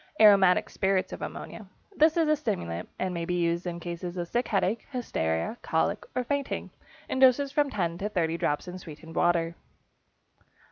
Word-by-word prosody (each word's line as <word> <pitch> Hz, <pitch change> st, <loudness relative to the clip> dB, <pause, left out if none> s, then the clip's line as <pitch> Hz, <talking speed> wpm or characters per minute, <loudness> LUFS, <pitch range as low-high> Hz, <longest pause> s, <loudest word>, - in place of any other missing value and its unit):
=Aromatic 195 Hz, -4 st, +6 dB
Spirits 190 Hz, -1 st, 0 dB
of -, -, -7 dB
Ammonia.= -, -, -7 dB, 0.3 s
This 315 Hz, +1 st, +4 dB
is 325 Hz, -2 st, +3 dB
a 305 Hz, -, +4 dB
stimulant, 180 Hz, -, -3 dB
and 185 Hz, -1 st, -2 dB
may 170 Hz, -1 st, -3 dB
be 180 Hz, +1 st, -1 dB
used 170 Hz, 0 st, 0 dB
in 170 Hz, -1 st, -4 dB
cases 175 Hz, +1 st, -5 dB
of 175 Hz, -1 st, -2 dB
sick 240 Hz, +7 st, -1 dB
headache, 205 Hz, +2 st, 0 dB
hysteria, 225 Hz, -, -2 dB
cholic, -, -, 0 dB
or 255 Hz, -, +1 dB
fainting, 280 Hz, +2 st, -2 dB, 0.4 s
in 260 Hz, -, -2 dB
doses 265 Hz, +2 st, +5 dB
of -, -, -21 dB
from 290 Hz, -1 st, +2 dB
10 175 Hz, -7 st, -2 dB
to 210 Hz, -, -2 dB
30 165 Hz, -5 st, 0 dB
drops 150 Hz, +4 st, -1 dB
in 180 Hz, +1 st, -6 dB
sweetened 160 Hz, -1 st, -11 dB
water. 170 Hz, -1 st, +2 dB
185 Hz, 180 wpm, -28 LUFS, 170-245 Hz, 0.4 s, =Aromatic